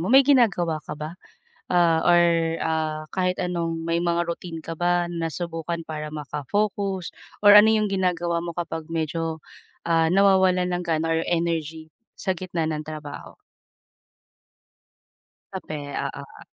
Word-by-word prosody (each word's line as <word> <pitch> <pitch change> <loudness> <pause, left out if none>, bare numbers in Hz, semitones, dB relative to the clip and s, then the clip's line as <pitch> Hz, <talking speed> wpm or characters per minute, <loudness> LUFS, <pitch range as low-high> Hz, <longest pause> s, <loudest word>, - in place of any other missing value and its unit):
mo, 180 - -2
may 270 +2 +7
ginagawa 195 - +3
ka - - -8
ba? 155 +2 -6 0.6
Ah, 170 -2 +3
or 175 0 +6 0.4
ah, 155 -1 -1
kahit 180 -1 0
anong 170 -2 -2
may 165 0 0
mga 170 0 +1
routine 170 -1 -5
ka 165 - -5
ba 175 0 +1
nasubukan 165 0 -4
para 150 -1 -4
maka-focus 190 +6 -2 0.3
or 205 - +9
ano 210 +1 +8
yung 215 -1 +2
ginagawa 175 -3 0
mo 170 - -4
kapag 165 -2 -4
medyo, 160 0 -2 0.5
ah, 165 -1 +3
nawawalan 190 -2 +4
ng 175 - -1
gana 165 0 0
or 165 0 +1
energy 165 -2 -2 0.3
sa 190 - -1
gitna 175 -2 -3
ng 155 -1 -2
trabaho? 155 -2 -8 2.2
Kape, 185 -5 -5 0.4
oo. - - -11
170 Hz, 135 wpm, -24 LUFS, 160-180 Hz, 2.2 s, or